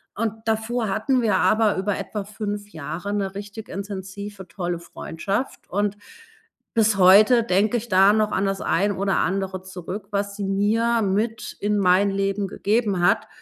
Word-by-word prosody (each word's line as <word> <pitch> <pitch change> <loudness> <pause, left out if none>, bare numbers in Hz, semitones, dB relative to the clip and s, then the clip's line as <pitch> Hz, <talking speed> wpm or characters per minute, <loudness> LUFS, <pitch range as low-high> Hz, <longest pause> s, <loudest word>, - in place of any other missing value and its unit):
Und 220 0 -1
davor 220 0 -1
hatten 250 +6 +1
wir 215 -4 +2
aber 215 -1 +3
über 195 +1 -1
etwa 210 -2 -4
5 205 -1 -5
Jahre 175 +4 -5
'ne 195 -1 -2
richtig 205 +2 -8
intensive, 195 0 -7
tolle 175 -1 -4
Freundschaft 195 +7 -5
und 205 +1 -1 0.8
bis 220 -3 +3
heute 210 +6 +7
denke 210 +3 +2
ich 235 +1 -6
da 190 +1 +6
noch 215 -1 +1
an 195 - 0
das 195 0 -1
ein 200 +4 +1
oder 195 0 +1
andere 190 0 -1
zurück, 190 +2 -7
was 200 0 -2
sie 200 -1 -4
mir 220 +4 +1
mit 215 +3 -1
in 210 0 0
mein 190 +2 +4
Leben 195 0 -1
gegeben 205 -2 0
hat. - - +2
200 Hz, 160 wpm, -23 LUFS, 195-215 Hz, 0.8 s, heute